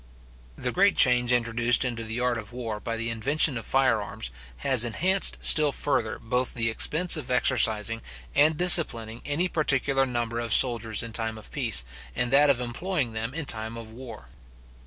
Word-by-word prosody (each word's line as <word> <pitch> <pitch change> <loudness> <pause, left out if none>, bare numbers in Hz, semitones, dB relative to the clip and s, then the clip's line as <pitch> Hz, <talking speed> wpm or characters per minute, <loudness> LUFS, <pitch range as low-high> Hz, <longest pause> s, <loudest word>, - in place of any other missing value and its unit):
The - - -3
great - - +2
change 125 -1 +3
introduced 120 +1 +1
into 120 -2 -5
the 115 +2 -6
art 125 -1 -1
of 105 -1 -11
war 115 -3 -6
by 115 +1 -5
the 115 0 -3
invention 140 +5 +1
of 115 - -6
fire 130 -5 +1
arms, - - -7 0.3
has 130 -4 +6
enhanced 185 - +2
still 150 -2 +5
further 120 -6 -2
both 125 +2 -3
the 115 -1 -2
expense 165 +9 +2
of 140 -4 -7
exercising 115 -3 +1 0.3
and 150 +2 +2
disciplining 120 -11 +3
any 155 +6 -1
particular 140 -4 -1
number 120 -2 -4
of 115 -2 -1
soldiers 115 -3 +1
in 115 -1 -9
time 110 -1 -2
of 110 - -14
peace, 115 - +1 0.3
and 125 0 -2
that 145 +2 +4
of 130 -3 +1
employing 125 +1 -4
them 115 +4 -5
in 165 -2 -4
time 110 -2 -3
of 115 -1 -11
war. 115 - -12
120 Hz, 180 wpm, -25 LUFS, 115-135 Hz, 0.3 s, has